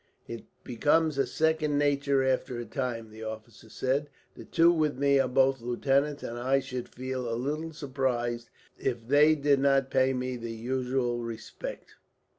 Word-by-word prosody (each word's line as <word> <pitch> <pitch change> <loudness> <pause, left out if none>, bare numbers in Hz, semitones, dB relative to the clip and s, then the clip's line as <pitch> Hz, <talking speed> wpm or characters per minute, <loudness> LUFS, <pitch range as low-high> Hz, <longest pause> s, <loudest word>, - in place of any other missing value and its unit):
"It 115 -1 -7 0.2
becomes 150 +4 +1
a 135 - +2
second 155 -2 +1
nature 140 -1 +2
after 130 -1 0
a 120 - -4
time," 115 -2 -4
the 110 +1 -11
officer 110 0 -8
said. 135 +6 -1 0.3
"The - - -10
two 170 +1 +4
with 155 -5 0
me 140 0 +3
are 135 - +3
both 135 0 +2
lieutenants, 140 +4 0
and 120 +1 -5
I 130 +3 +2
should 125 -2 -6
feel 130 -1 -4
a - - -1
little 150 +6 -3
surprised 130 -5 -2 0.3
if 120 -3 -2
they 150 +3 +5
did 145 -2 +2
not 135 -1 +2
pay 130 0 +3
me 125 0 -3
the 115 -1 -6
usual 125 +1 -1
respect." 115 -1 -7
130 Hz, 165 wpm, -28 LUFS, 120-140 Hz, 0.3 s, they